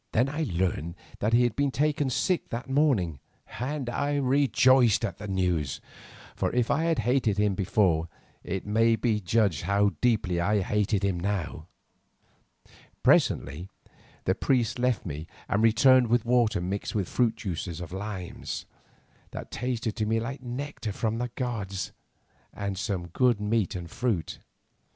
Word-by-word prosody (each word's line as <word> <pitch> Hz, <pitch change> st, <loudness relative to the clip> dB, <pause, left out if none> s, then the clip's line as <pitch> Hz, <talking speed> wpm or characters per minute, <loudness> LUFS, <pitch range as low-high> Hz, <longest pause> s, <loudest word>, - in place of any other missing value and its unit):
Then 125 Hz, +4 st, +3 dB
I 155 Hz, +2 st, -2 dB
learned 85 Hz, -2 st, -1 dB, 0.2 s
that 105 Hz, -, 0 dB
he 120 Hz, +1 st, +5 dB
had 120 Hz, -3 st, 0 dB
been 140 Hz, 0 st, +1 dB
taken 145 Hz, +1 st, 0 dB
sick 175 Hz, +8 st, 0 dB
that 120 Hz, +4 st, -5 dB
morning, 130 Hz, -, +1 dB, 0.4 s
and 135 Hz, +1 st, -3 dB
I 140 Hz, +4 st, -1 dB
rejoiced 130 Hz, -3 st, +4 dB
at -, -, -5 dB
the 105 Hz, -, -6 dB
news, 90 Hz, -7 st, 0 dB, 0.6 s
for -, -, -1 dB
if 125 Hz, -2 st, +2 dB
I 160 Hz, +4 st, +1 dB
had 165 Hz, -2 st, +2 dB
hated 120 Hz, -5 st, +2 dB
him 105 Hz, -1 st, +2 dB
before, 95 Hz, -4 st, +1 dB, 0.3 s
it 95 Hz, +1 st, -4 dB
may 115 Hz, +2 st, +3 dB
be 110 Hz, -2 st, 0 dB
judged 100 Hz, -4 st, +1 dB
how 100 Hz, +3 st, +2 dB
deeply 105 Hz, -8 st, +2 dB
I 100 Hz, +4 st, +2 dB
hated 105 Hz, +1 st, 0 dB
him 95 Hz, -3 st, 0 dB
now. 90 Hz, -4 st, -3 dB, 1.4 s
Presently 80 Hz, +8 st, +2 dB, 0.5 s
the -, -, +2 dB
priest 125 Hz, -2 st, 0 dB
left 125 Hz, -4 st, +1 dB
me 80 Hz, -1 st, -5 dB, 0.2 s
and 100 Hz, -, +1 dB
returned 125 Hz, +3 st, +5 dB
with 120 Hz, 0 st, +2 dB
water 120 Hz, -4 st, +3 dB
mixed 95 Hz, +5 st, -3 dB
with 100 Hz, -4 st, -2 dB
the 125 Hz, -2 st, +4 dB
juice 95 Hz, -6 st, -4 dB
of 85 Hz, -2 st, -7 dB
limes, 95 Hz, -2 st, -5 dB, 0.6 s
that -, -, -8 dB
tasted 120 Hz, -2 st, -2 dB
to 110 Hz, -2 st, 0 dB
me 115 Hz, +1 st, +2 dB
like 130 Hz, +4 st, -5 dB
nectar 125 Hz, -2 st, -5 dB
from 110 Hz, +2 st, -1 dB
the 125 Hz, 0 st, -2 dB
gods, 100 Hz, -7 st, -3 dB, 0.6 s
and 100 Hz, -1 st, -4 dB
some 95 Hz, -3 st, -3 dB
good 120 Hz, +4 st, +2 dB
meat 105 Hz, -1 st, 0 dB
and 85 Hz, -2 st, -6 dB
fruit. 110 Hz, -11 st, -2 dB
110 Hz, 155 wpm, -27 LUFS, 95-125 Hz, 1.4 s, he